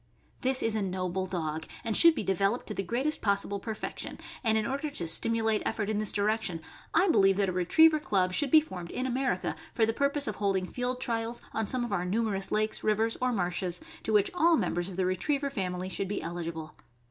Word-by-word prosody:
This 260 0 +2
is 225 - +1
a 215 - 0
noble 185 -1 -2
dog, 160 -3 -3 0.2
and 220 - -1
should 335 -1 +7
be - - -2
developed 195 +4 0
to 215 - -4
the 195 - -2
greatest 255 - -1
possible 200 -1 0
perfection; 220 0 -5 0.3
and 220 -2 +3
in 215 - 0
order 280 +4 -2
to 180 -12 -4
stimulate 225 +4 +1
effort 215 -1 -1
in 210 - 0
this 215 -2 +1
direction, 205 -4 0 0.3
I 390 - +4
believe 195 - +4
that 200 -2 +2
a - - 0
Retriever 305 - +5
club 185 -9 +1
should 285 +7 +1
be 310 +4 +7
formed 180 - -8
in 255 - -3
America 260 +1 -1 0.2
for 225 - +4
the 225 - 0
purpose 280 +3 +1
of 215 - -3
holding 195 -2 0
field 250 +5 -2
trials 230 -1 -2
on 220 -2 -1
some 250 +1 0
of 225 - -4
our 180 -3 0
numerous 195 0 -1
lakes, 215 0 0
rivers, 220 +1 +1
or 255 0 +2
marshes, 180 -3 -2 0.2
to - - -3
which 210 -2 +3
all 340 -2 +4
members 175 -2 -1
of 185 - -8
the 185 - +1
Retriever 275 +10 0
family 185 -5 -3
should 190 +1 -3
be 205 - -2
eligible. 165 -2 -5
210 Hz, 215 wpm, -29 LUFS, 185-245 Hz, 0.3 s, should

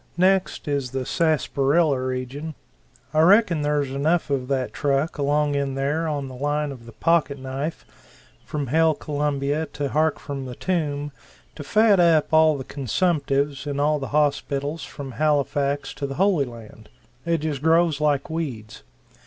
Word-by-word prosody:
Next 190 -1 +2
is 140 -3 -1
the 130 0 -3
sassparilla 150 -2 +2
region. 130 +4 -4 0.6
I 155 - +2
reckon 180 -2 +5
there's 145 -2 0
enough 155 +3 0
of 130 -2 -1
that 130 -2 -1
truck 145 +3 0
along 145 +1 +1
in 140 -1 -1
there 145 +4 -1
on 145 -3 -2
the 130 - -9
line 145 +2 -1
of 120 -4 -11
the - - -10
pocket 160 +2 +1
knife, 135 +4 -5 0.6
from 145 -2 -3
Hail 160 +4 +3
Columbia 145 +1 -1
to 145 -1 -2
Hark 155 +2 +1
from 140 -2 -6
the 125 - -7
Tomb 145 -5 -2 0.4
to 145 - -8
fat 210 +5 +4
up 165 -3 +3
all 155 -1 +5
the 135 - -5
consumptives 140 - -1
in 140 -1 -2
all 150 +1 +2
the 135 - -4
hospitals 145 +1 0
from 140 -2 -8
Halifax 145 +1 0
to 140 - -4
the 135 - -6
Holy 185 -5 +2
Land. 110 -3 -12 0.3
It 165 -1 0
just 150 -3 -3
grows 160 -1 +3
like 145 -2 +1
weeds! 135 -10 -5
145 Hz, 160 wpm, -23 LUFS, 135-160 Hz, 0.6 s, reckon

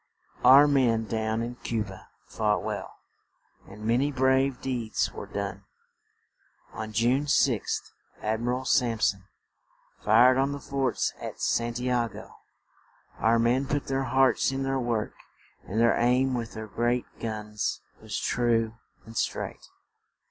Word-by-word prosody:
Our 135 +4 +8
men 120 -6 +2
down 110 +1 -1
in 120 +1 -6
Cu 115 -3 -2
ba 95 -2 -12 0.2
fought 105 -1 0
well, - - -4 0.8
and 105 +2 -10
ma 115 +2 +3
ny 140 +3 +1
brave 130 0 +2
deeds 120 -4 -2
were - - -7
done. - - -5 1.1
On 110 0 -6
June 120 +6 +2
6th 130 -6 +1 0.3
Ad 110 +1 -1
mi 120 - -3
ral 125 +1 -1
Samp 120 -4 +1
son 100 -1 +1 0.7
fired 125 +5 +5
on 135 +1 +1
the 140 - -5
forts 135 -4 -1
at - - -7
San 120 0 0
ti 125 +1 -2
a 120 -2 +1
go; - - -11 0.9
our 115 +1 +3
men 120 +4 +2
put 145 0 -1
their 135 0 -1
hearts 130 0 +3
in 135 0 -2
their 135 0 0
work 120 -4 -1 0.5
and 105 +4 -2
their 115 0 +4
aim 125 +2 +2
with 120 -2 -3
the 110 -1 -6
great 120 +4 0
guns 105 -1 -3 0.2
was - - -5
true 115 -2 0 0.3
and 115 - -12
straight. - - -3
120 Hz, 150 wpm, -27 LUFS, 110-130 Hz, 1.1 s, Our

